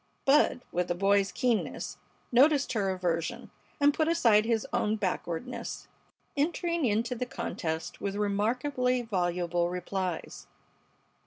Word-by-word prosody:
Bud, 275 -2 +4
with 180 0 -1
a 175 - +1
boy's 195 +1 +3
keenness, 245 -4 -1 0.3
noticed 280 +3 +4
her 200 -4 0
aversion, 175 -3 -2 0.3
and 290 0 +5
put 315 +1 +1
aside 230 -11 +4
his 225 -2 +1
own 215 +1 +1
backwardness, 190 +3 -4 0.5
entering 335 +2 0
into 230 +2 +1
the 250 +1 -3
contest 160 -8 -4
with 200 0 -2
remarkably 250 +5 0
voluble 175 -4 0
replies. 180 -1 -4
210 Hz, 115 wpm, -29 LUFS, 180-255 Hz, 0.5 s, and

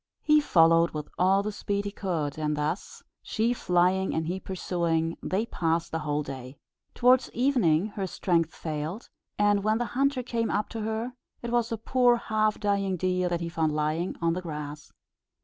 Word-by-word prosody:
He 305 -1 +5
followed 165 - +4
with 150 -1 -5
all 190 +2 +4
the 210 - -2
speed 200 0 -2
he 205 - -3
could, 165 -8 -2
and 150 -1 -1
thus, 155 +5 -3 0.2
she 225 +2 0
flying 185 -2 +1
and 160 - 0
he 180 +3 -2
pursuing, 170 -3 -1
they 200 +5 -1
passed 165 -6 -1
the 160 - -1
whole 150 -1 -1
day. 130 -1 -8 0.4
Towards 255 +1 +4
evening 220 - +2
her 200 -2 -4
strength 165 -3 0
failed; 160 +7 -5 0.3
and 205 -1 +3
when 215 +1 +2
the 240 - -1
hunter 275 0 +1
came 230 -2 -1
up 210 - -1
to 225 - -5
her 220 +3 -3 0.3
it 235 - -3
was 240 0 +1
a 230 - -1
poor 245 +2 +3
half 215 -2 0
dying 200 -2 0
deer 180 0 0
that 175 -1 -1
he 170 - -2
found 160 -2 0
lying 155 +4 -1
on 165 0 +3
the 180 - -3
grass. 150 -3 -7
185 Hz, 185 wpm, -27 LUFS, 165-220 Hz, 0.4 s, He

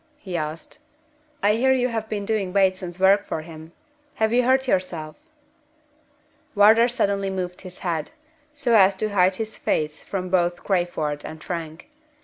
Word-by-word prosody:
he 185 -8 -7
asked. 155 - -5 0.6
"I 205 +1 +4
hear 255 +4 +2
you 255 -1 +2
have 220 -2 -4
been 205 -2 -3
doing 200 -3 -1
Bateson's 185 -2 0
work 195 +2 +5
for 155 - -4
him. 160 0 -11 0.4
Have 220 +1 +1
you 245 - +4
hurt 260 +2 +2
yourself?" 170 -7 -2 1.4
Wardour 220 +3 +6
suddenly 200 -5 0
moved 180 -2 -4
his 185 -2 -10
head, 165 -3 -2 0.4
so 280 -6 +1
as 195 -2 +6
to 215 +3 -2
hide 190 -2 +3
his 220 +1 -5
face 155 0 -1
from 185 -2 -4
both 175 -1 +1
Crayford 175 -6 -1
and 155 0 -9
Frank. 165 -3 -6
190 Hz, 155 wpm, -23 LUFS, 175-220 Hz, 1.4 s, Wardour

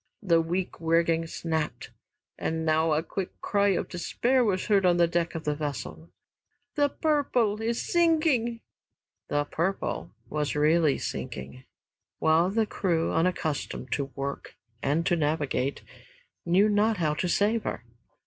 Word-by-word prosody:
The 170 -4 +4
weak 175 +3 -2
rigging 165 0 +2
snapped, 160 -2 -3 0.4
and 160 0 -2
now 160 0 +2
a 155 +2 +1
quick 185 +3 -5
cry 205 -1 +1
of - - -2
despair 245 +8 +1
was 190 -5 0
heard 200 -2 +3
on 175 -1 +4
the 170 -1 +4
deck 170 0 -1
of 160 - -4
that 150 -1 -1
vessel. 85 - -5 0.6
"'The 290 -1 +2
Purple' 255 -9 +1
is 230 +1 -1
sinking!" 310 -9 +2 0.7
"The 145 0 +1
Purple" 170 +6 -2 0.2
was 150 -1 -2
really 155 0 +3
sinking, 130 0 -6 0.5
while 160 +3 +3
the 220 +2 +1
crew, 170 -5 0
unaccustomed 160 -6 -1
to 140 - 0
work 140 0 -5 0.3
and 150 +4 +1
to 175 - +3
navigate, 145 -3 -1 0.6
knew 190 +5 +5
not 210 +1 +2
how 155 -4 +1
to 175 +4 -2
save 215 +5 +2
her. 120 - -4
170 Hz, 140 wpm, -27 LUFS, 155-205 Hz, 0.7 s, knew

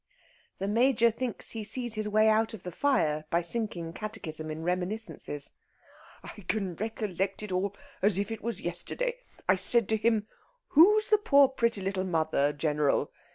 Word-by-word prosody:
The 195 - -3
Major 235 +1 +4
thinks 240 +1 -3
he 225 -2 -4
sees 240 +2 -2
his 215 -1 -2
way 215 +1 +4
out 220 +1 +2
of 190 - -13
the 180 - -5
fire 155 - +1
by 170 +1 +1
sinking 175 -4 -2
catechism 165 -8 -3
in 155 +1 -5
reminiscences. 180 -4 -2 0.7
"I 210 - -10
can 195 -5 -1
recollect 200 -3 -3
it 210 - -6
all 190 +2 -1 0.3
as 200 -1 +3
if 200 +2 -2
it 225 - -5
were 235 - -2
yesterday. 235 - -3 0.3
I 185 +1 +4
said 220 +3 +2
to 220 - +2
him, 220 -1 +1 0.4
'Who's 420 +8 +6
the 425 - +6
poor 280 -8 +5
pretty 235 -6 0
little 190 0 -1
mother, 160 -5 +1
General?' 150 -1 0
210 Hz, 165 wpm, -29 LUFS, 175-230 Hz, 0.7 s, Who's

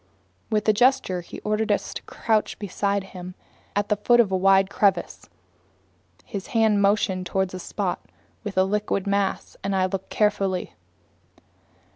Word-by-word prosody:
With 215 -1 0
a 215 - +6
gesture 210 -6 +2
he 175 - -10
ordered 215 +1 0
us - - -1
to - - -6
crouch 220 -2 0
beside 200 -1 -1
him 185 -1 -9 0.4
at 205 0 0
the 210 - +3
foot 240 +4 +3
of 215 -5 +4
a - - +2
wide 195 +1 +4
crevice. 200 0 0 1.0
His 200 -1 -6
hand 215 -2 +4
motioned 195 -2 +1
toward 190 +1 -1
a 185 - -5
spot - - -3 0.4
within 195 -3 +1
the - - -1
liquid 205 -1 -1
mass, 200 -1 -1
and 195 0 -1
I 185 -1 +3
looked 190 0 -4
carefully. 195 -3 0
200 Hz, 155 wpm, -24 LUFS, 190-210 Hz, 1.0 s, a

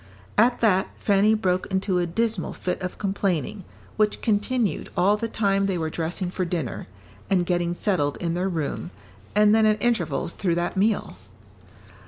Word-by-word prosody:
At 240 +3 +3
that, 190 -5 +3
Fanny 205 +2 +3
broke 185 -4 0
into 190 -1 0
a 175 - 0
dismal 215 +2 -1
fit 180 - -3
of 180 0 -4
complaining, 195 -2 -1 0.3
which 215 -1 +2
continued 215 -3 0
all 200 +3 +4
the 230 +2 -3
time 195 -3 +1
they 190 -2 0
were 160 -1 -2
dressing 175 +3 -3
for 185 - -2
dinner, 170 -8 -3 0.4
and 180 -3 +2
getting 175 -1 0
settled 175 -8 0
in 170 -2 -2
their 180 +2 0
room, 150 - -3 0.5
and 210 0 +5
then 220 0 +5
at 215 0 +2
intervals 220 -8 0
through 175 -4 0
that 175 +3 -1
meal. 200 - 0
190 Hz, 165 wpm, -24 LUFS, 175-210 Hz, 0.5 s, and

